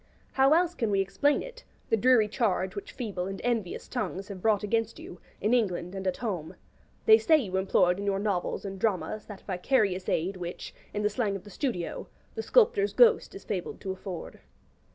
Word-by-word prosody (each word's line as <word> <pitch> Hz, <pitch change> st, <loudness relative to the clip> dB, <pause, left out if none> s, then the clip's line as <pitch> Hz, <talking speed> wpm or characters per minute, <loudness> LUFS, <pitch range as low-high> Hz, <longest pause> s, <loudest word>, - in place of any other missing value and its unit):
How 270 Hz, +3 st, +5 dB
else 350 Hz, 0 st, +2 dB
can 230 Hz, -10 st, -1 dB
we 200 Hz, -1 st, +2 dB
explain 195 Hz, +10 st, +1 dB
it, -, -, -11 dB, 0.3 s
the -, -, +6 dB
dreary 235 Hz, -1 st, +4 dB
charge 205 Hz, -4 st, 0 dB
which 405 Hz, 0 st, -6 dB
feeble 200 Hz, -7 st, -4 dB
and 195 Hz, 0 st, -5 dB
envious 230 Hz, -7 st, -2 dB
tongues 195 Hz, +2 st, -4 dB
have 190 Hz, -2 st, -7 dB
brought 215 Hz, -1 st, +2 dB
against 225 Hz, +1 st, -1 dB
you, 175 Hz, -, -10 dB, 0.2 s
in 215 Hz, +4 st, +1 dB
England 185 Hz, -6 st, 0 dB
and 190 Hz, -1 st, -4 dB
at 185 Hz, -, 0 dB
home? 185 Hz, -10 st, -4 dB, 0.5 s
They 440 Hz, 0 st, +8 dB
say 320 Hz, -2 st, +5 dB
you 200 Hz, -10 st, -3 dB
employed 185 Hz, -1 st, +2 dB
in 200 Hz, -, -4 dB
your 195 Hz, -1 st, +1 dB
novels 200 Hz, -1 st, -2 dB
and 195 Hz, -1 st, -6 dB
dramas 215 Hz, +1 st, -1 dB
that 205 Hz, -3 st, -10 dB
vicarious 190 Hz, -1 st, 0 dB
aid 185 Hz, +4 st, 0 dB
which, 175 Hz, -1 st, -6 dB, 0.2 s
in 210 Hz, -, -3 dB
the 210 Hz, -, +3 dB
slang 210 Hz, -2 st, -1 dB
of 190 Hz, -, -6 dB
the 205 Hz, -, -12 dB
studio, 185 Hz, -, -3 dB, 0.3 s
the 450 Hz, -, -3 dB
'sculptor's 425 Hz, -3 st, +3 dB
ghost' 480 Hz, -5 st, +4 dB
is 390 Hz, -, -9 dB
fabled 185 Hz, -4 st, -4 dB
to 190 Hz, -, -3 dB
afford. 190 Hz, -2 st, -7 dB
205 Hz, 195 wpm, -28 LUFS, 190-245 Hz, 0.5 s, They